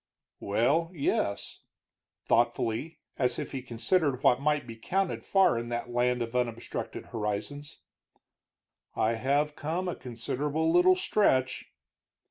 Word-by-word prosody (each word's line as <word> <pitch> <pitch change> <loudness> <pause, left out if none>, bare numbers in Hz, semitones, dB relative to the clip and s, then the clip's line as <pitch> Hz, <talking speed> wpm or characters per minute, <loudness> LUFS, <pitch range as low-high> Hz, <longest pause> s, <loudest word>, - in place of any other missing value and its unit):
"Well, 135 +11 +1
yes," 100 -8 -1 0.7
thoughtfully, 120 +5 0 0.2
as 125 -2 +1
if - - -4
he 135 - -4
considered 130 +3 0
what 125 +2 +4
might 150 -1 +1
be 115 -1 -8
counted 185 +11 -1
far 190 -12 +3
in 120 0 -5
that 120 0 -3
land 125 0 +1
of 115 +1 -7
unobstructed 120 -2 -3
horizons, 110 +7 -4 1.2
"I 110 - +2
have 140 +6 0
come 165 +5 -2
a 180 - -2
considerable 145 +6 -2
little 180 +2 +6
stretch." 130 - +1
130 Hz, 120 wpm, -29 LUFS, 120-155 Hz, 1.2 s, little